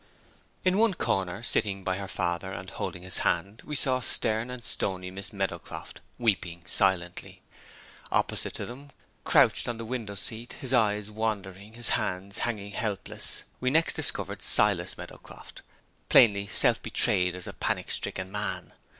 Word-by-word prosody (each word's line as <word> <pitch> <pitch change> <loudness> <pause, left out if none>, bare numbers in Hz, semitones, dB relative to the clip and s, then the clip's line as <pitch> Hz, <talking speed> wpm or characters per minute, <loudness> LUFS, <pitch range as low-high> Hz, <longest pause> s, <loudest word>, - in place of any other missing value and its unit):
In 185 +2 +3
one 225 -4 +3
corner, 95 - -1
sitting 100 -5 0
by 95 0 -1
her 100 0 -5
father, 85 0 -2
and 95 +1 -7
holding 90 -2 -5
his 95 - 0
hand, 100 +3 -1
we 150 - -5
saw 130 -2 +2
stern 110 -1 +1
and 125 -1 -7
stony 90 -3 -2
Miss 100 +1 -6
Meadowcroft 95 -4 -5 0.2
weeping 90 -7 -1
silently. 90 -2 -1 0.7
Opposite - - -1
to - - -4
them, 135 +4 -10 0.4
crouched - - +4
on 120 - -3
the 115 - -6
window 110 -4 -5
seat, 110 +4 -5
his 130 -3 -3
eyes 105 -3 +2
wandering, 105 -2 -4
his 120 -1 +1
hands 95 +2 -1
hanging 105 -4 -2
helpless, 105 -2 -2 0.2
we 130 - +1
next 160 +4 +3
discovered - - 0
Silas - - +5
Meadowcroft, - - -12 0.5
plainly 100 -3 +6
self 90 - +5
betrayed 90 0 +3
as 90 - -7
a - - -7
panic - - -2
stricken 95 0 -1
man. 105 -1 -4
100 Hz, 150 wpm, -28 LUFS, 95-120 Hz, 0.7 s, plainly